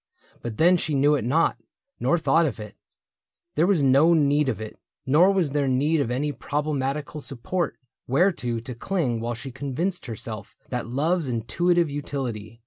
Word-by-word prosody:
But 115 -2 -5
then 175 +3 +5
she 155 -3 -1
knew 145 +2 +4
it 145 - 0
not, 155 +8 +2 0.4
nor 170 - +2
thought 165 0 +3
of 120 - -5
it; 105 -1 -8 0.8
There 160 +4 +2
was 185 -7 +3
no 140 +6 +5
need 145 -2 +3
of 115 - -2
it; 110 -1 -8 0.3
nor 160 +8 +5
was 185 -7 +1
there 145 -1 +1
need 145 +4 +2
Of 120 - -1
any 140 +4 -1
problematical 145 +1 -3
support 140 +6 -3 0.3
Whereto 130 -5 +1
to 125 +2 -7
cling 125 -2 -1
while 120 +1 -3
she 130 +4 -7
convinced 140 +7 -3
herself 110 -2 -7
That 125 -2 -3
love's 155 +6 0
intuitive 155 +9 +1
utility. 125 -7 -5
140 Hz, 165 wpm, -25 LUFS, 125-160 Hz, 0.8 s, then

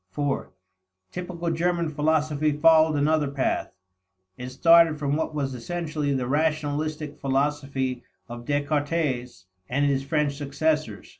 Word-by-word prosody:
(iv) 145 -1 -1 0.6
Typical 175 -1 -4
German 170 +1 0
philosophy 155 0 +1
followed 160 0 +5
another 150 +1 +2
path. 140 -1 -1 0.6
It 125 +4 -7
started 165 +3 +5
from 145 -1 -1
what 160 0 -2
was 135 -3 -2
essentially 155 +2 -3
the 130 -2 -1
rationalistic 150 +1 -1
philosophy 135 -2 -1 0.3
of 120 0 -8
Descartes 145 - -1 0.2
and 140 +3 +1
his 140 -1 +1
French 145 0 0
successors. 145 -4 -2
150 Hz, 120 wpm, -25 LUFS, 140-155 Hz, 0.6 s, followed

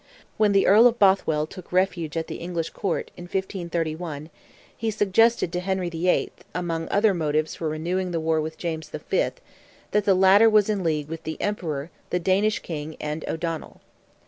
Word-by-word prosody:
When 210 -1 +4
the 195 -1 +4
Earl 220 +5 +7
of 240 -1 0
Bothwell 190 -7 +3
took 180 +3 -12
refuge 180 -4 0
at 165 - -1
the - - -6
English 170 -1 -4
Court, 195 -4 -3
in 175 - -9
1531, 170 -4 -3 0.4
he 225 - -2
suggested 210 -1 +2
to 180 - 0
Henry 185 -1 -2
VIII., 170 +2 +1 0.2
among 165 -2 -2
other 205 0 +3
motives 155 -2 0
for 160 - -3
renewing 175 +4 -2
the 170 -2 -1
war 160 0 +1
with 160 +1 -5
James 160 -3 -4
V., - - -7 0.9
that 210 -1 +1
the 195 - +4
latter 195 +4 +6
was 215 -1 +4
in 200 -3 -1
league 155 -3 0
"with 165 +1 -6
the 160 0 -6
Emperor, 165 -7 -3 0.2
the - - 0
Danish 195 +4 +2
King, 155 -1 -5
and 150 +1 -4
O'Donnell." 165 -1 -4
175 Hz, 175 wpm, -24 LUFS, 160-195 Hz, 0.9 s, Earl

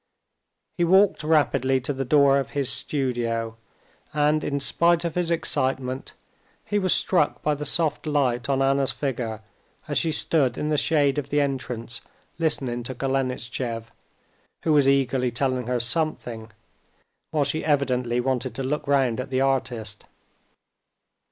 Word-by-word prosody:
He - - +3
walked 190 +1 +4
rapidly 140 -4 +2
to 135 +4 -2
the 135 0 -3
door 140 +1 +4
of 135 - -4
his 135 -2 +3
studio, 115 -5 -1 0.6
and 150 +1 +2
in 140 0 -1
spite 170 +4 +2
of 170 - -2
his 175 -1 -1
excitement 135 -5 -1 0.5
he 205 - 0
was 185 -2 0
struck 175 -6 +2
by 150 - +2
the 145 0 -3
soft 155 0 0
light 130 -4 0
on 135 0 +2
Anna's 135 0 +2
figure 120 -6 -3 0.5
as - - +1
she 165 - 0
stood 140 -5 +2
in 150 - -2
the 155 - +1
shade 145 -2 +2
of 140 -1 -6
the 145 - +1
entrance 130 -4 -3 0.4
listening 135 -7 0
to 125 +2 -5
Golenishtchev, 125 -3 -3 0.7
who 160 - +2
was 145 -2 +4
eagerly 130 -2 +2
telling 125 0 -1
her 125 -1 0
something, 120 -4 -1 0.8
while 150 -2 +1
she 140 +3 -2
evidently 125 -5 +1
wanted 130 0 -2
to 135 - -3
look 150 +2 -2
round 135 -4 +2
at 130 - -4
the 130 0 0
artist. 120 -6 -1
135 Hz, 150 wpm, -24 LUFS, 125-150 Hz, 0.8 s, walked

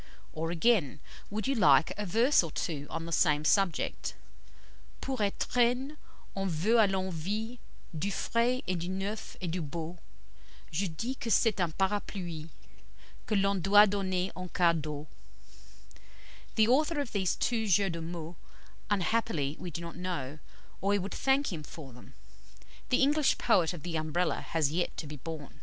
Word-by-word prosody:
Or 160 +1 -2
again, 170 - +2 0.3
would 210 +1 -3
you 275 - +2
like 145 - +5
a 210 -1 -4
verse 235 +10 +4
or 165 - -4
two 145 -2 -3
on 165 - -4
the 170 - -6
same 150 -2 +3
subject? 195 -1 +1 0.8
"Pour 265 -1 -3
étrenne, 245 +6 +1 0.4
on 195 -1 -1
veut 185 +9 +2
à 215 -3 +6
l'envie 195 +5 -2 0.4
Du 180 +6 -1
frais 235 +7 0
et 185 - 0
du 175 +2 -4
neuf 195 +3 -4
et 185 - -2
du 180 +1 -2
beau, 165 +3 -5 0.7
Je 185 +5 0
dis 225 +10 -3
que 235 -3 -6
c'est 215 -1 +3
un 175 - +2
parapluie, 185 -3 -2 0.8
Que 215 - +1
l'on 195 0 +3
doit 205 +4 +7
donner 190 -2 -1
en 185 0 -5
cas 170 -1 +3
d'eau." 150 -2 -4 1.5
The 220 0 +5
author 300 +5 +3
of 280 -5 -3
these 190 -3 0
two 225 -2 0
jeux 195 0 +3
de 165 - -4
mots 165 0 -6 0.5
unhappily 195 - 0
we 180 - -5
do 170 +1 -6
not 170 -1 -7
know, 160 -6 -4 0.4
or 195 - 0
we 205 - +4
would 195 +1 -4
thank 270 -4 +1
him 160 - -4
for 145 -3 -10
them. 125 - -15 0.7
The 255 - +3
English 295 +1 +3
poet 180 -8 +3
of 175 -5 -8
the 170 -2 -2
Umbrella 155 +1 0
has 155 -3 0
yet 175 +2 -1
to - - -4
be 150 0 -7
born. 150 0 -8
185 Hz, 165 wpm, -30 LUFS, 160-215 Hz, 1.5 s, doit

